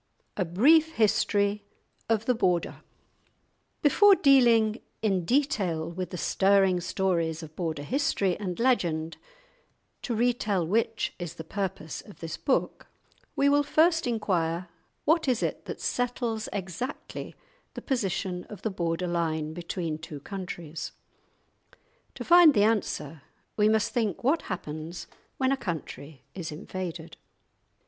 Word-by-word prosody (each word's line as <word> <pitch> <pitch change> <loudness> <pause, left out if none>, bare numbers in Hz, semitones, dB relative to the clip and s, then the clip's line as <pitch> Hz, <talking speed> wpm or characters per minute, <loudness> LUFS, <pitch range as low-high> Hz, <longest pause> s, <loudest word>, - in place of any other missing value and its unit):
II.—A 190 - 0
BRIEF 300 - +4
HISTORY 205 -2 +2 0.5
OF 225 -1 +1
THE 250 - +3
BORDER 180 -7 0 1.0
Before 400 +7 +6
dealing 235 - +4 0.2
in 190 -5 +1
detail 190 - 0
with 180 0 -4
the 180 - -6
stirring 195 0 +3
stories 170 -3 -1
of 155 0 -11
Border 160 -5 -3
history 200 - 0
and 185 -2 -4
legend, 170 -10 +1 0.8
to 240 - -2
retell 220 -6 +1
which 225 +5 0
is 175 -3 -5
the 160 - -7
purpose 170 -3 -4
of 205 - -15
this 165 -1 -5
book, 215 +11 -1 0.5
we 280 - +3
will 285 +1 +5
first 325 +2 +3
inquire—What 185 - -1
is 250 -3 +1
it - - -3
that - - -6
settles 240 -3 -2
exactly 200 - -5 0.4
the - - -6
position 190 - -2
of 210 - -11
the 220 - -1
border 170 -1 -2
line 160 -3 -1
between 170 -2 -4
two 155 -2 -8
countries? 170 -3 -6 1.2
To - - -6
find 345 -4 +7
the 205 - +5
answer 165 -9 -1 0.3
we 210 0 +4
must 220 0 +1
think 225 -7 -1
what 290 +7 +2
happens 160 -1 -5 0.3
when 260 0 +1
a - - +3
country 155 - -6
is 170 -4 -5
invaded. 165 +1 -6
195 Hz, 130 wpm, -27 LUFS, 165-235 Hz, 1.2 s, find